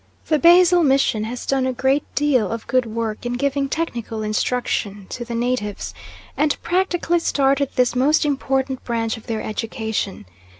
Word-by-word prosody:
The 310 -2 +3
Basel 350 +1 +6
Mission 270 -6 +2
has 240 +2 -6
done 265 -1 +1
a 260 - -1
great 265 +3 +2
deal 265 -9 +2
of 230 -1 -4
good 255 -2 +1
work 220 -1 -3
in 240 0 -2
giving 275 +2 0
technical 235 -8 -3
instruction 210 -2 -1
to 245 - -5
the 235 0 -5
natives, 235 -4 -2 0.4
and 300 -1 +1
practically 350 -1 +1
started 275 -3 +1
this 250 0 +2
most 295 +5 +3
important 270 -2 -1
branch 225 -2 -1
of 225 - -13
their 225 -1 -2
education. 220 - -3
255 Hz, 160 wpm, -21 LUFS, 225-285 Hz, 0.4 s, Basel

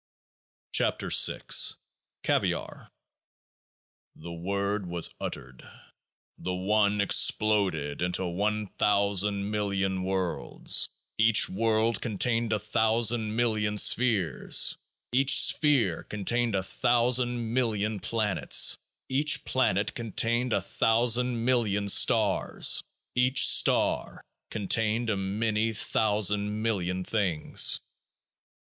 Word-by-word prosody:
13 - - -1
KEOAAH - - +4 0.3
F - - -32 0.5
CAVIAR - - -3 1.3
The 85 +2 -11
Word 100 +3 -4
was 85 -1 -1
uttered: 65 -1 -6 0.8
the 90 - -4
One 105 +2 0
exploded 100 -7 +1
into 90 +1 -1
one 105 +4 -2
thousand 100 0 0
million 95 -3 -2
worlds. 95 -2 0 0.3
Each 110 0 +4
world 110 +2 0
contained 115 +1 -1
a 110 - +1
thousand 110 +1 0
million 110 -3 -1
spheres. 105 - +2 0.4
Each 135 +2 +3
sphere 125 - +2
contained 115 +2 -2
a 95 - -1
thousand 120 +1 0
million 110 -4 -2
planes. 110 -3 +2 0.3
Each 145 +3 0
plane 100 -6 0
contained 115 +2 -2
a 100 -2 0
thousand 120 +3 0
million 110 -5 0
stars. 100 0 +2 0.3
Each 125 +1 +3
star - - +1 0.3
contained 110 +2 -1
a - - -1
many 105 +3 -2
thousand 105 0 -1
million 95 -5 -2
things. 90 -7 +1
105 Hz, 95 wpm, -26 LUFS, 100-115 Hz, 1.3 s, KEOAAH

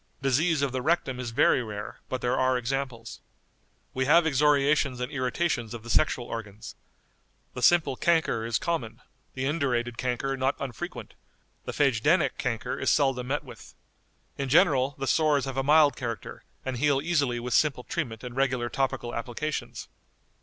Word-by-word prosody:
Disease 140 +3 +1
of 140 - 0
the 130 0 -2
rectum 135 -4 0
is 125 -2 -4
very 125 +2 +3
rare, 105 -3 -7
but 130 - -3
there 125 +1 +1
are 130 0 +2
examples." 125 -3 -4 0.7
"We 130 0 0
have 165 +4 +5
excoriations 145 -2 +2
and 125 0 -3
irritations 130 -3 -1
of 115 - -9
the 120 - -6
sexual 125 -2 +2
organs. 110 -3 -7 0.8
The 125 - -6
simple 150 -1 +4
chancre 160 -7 +1
is 115 -2 0
common; 160 -10 -3 0.3
the 130 0 -2
indurated 125 -6 -1
chancre 130 +2 -1
not 135 +1 0
unfrequent; 130 -5 -6 0.5
the - - -3
phagedænic 145 +5 +2
chancre 120 -4 -3
is - - +1
seldom 135 -4 +2
met 145 +3 -1
with. 125 -5 -13 0.6
In 135 -1 -2
general, 135 -1 +4
the 135 - -3
sores 150 -1 +2
have 135 -1 -5
a 135 - +1
mild 145 0 +5
character, 115 -5 -6 0.2
and 130 -2 -3
heal 140 +1 +2
easily 140 -6 0
with 120 0 -4
simple 140 -5 +2
treatment 120 -10 -4
and 125 -1 -7
regular 130 -3 0
topical 135 -3 -2
applications. 125 +6 -4
130 Hz, 160 wpm, -27 LUFS, 120-145 Hz, 0.8 s, have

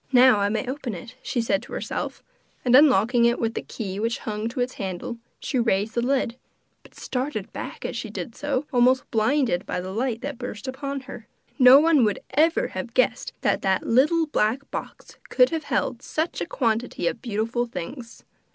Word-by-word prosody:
'Now 255 -3 +6
I 200 0 +2
may 220 +4 -2
open 255 -4 -4
it,' 225 +8 -9
she 245 - -1
said 205 -3 +1
to - - -12
herself; - - -4 0.4
and 250 0 +5
unlocking 245 -4 +5
it 235 +1 +3
with 225 -1 -1
the - - -3
key 195 -4 -6
which 230 +2 0
hung 215 0 -4
to 250 - -6
its 250 +1 0
handle, 190 +5 -4 0.2
she 260 - -1
raised 220 -2 +1
the 235 - 0
lid, 250 -2 0 0.4
but - - -20
started 250 -5 -4
back - - -6
as - - -3
she - - -4
did 235 - -6
so, 285 +1 -2
almost 255 +1 +3
blinded 225 -4 +2
by - - -2
the 185 +1 -5
light 235 +2 -2
that 280 -2 -5
burst 245 -2 -6
upon 275 +1 -4
her. 245 -4 -10 0.3
No 255 +1 +9
one 310 -4 +4
would 210 -2 +2
ever 325 - +2
have - - -6
guessed - - +1
that - - +1
that 190 -1 +1
little 305 +8 +3
black 270 -1 -1
box - - -7
could - - +4
have 320 -2 -3
held 245 -3 -1
such 315 +4 -3
a - - -2
quantity 230 - -1
of 225 - -1
beautiful 230 +1 -1
things! 230 - -8
245 Hz, 195 wpm, -24 LUFS, 220-270 Hz, 0.4 s, No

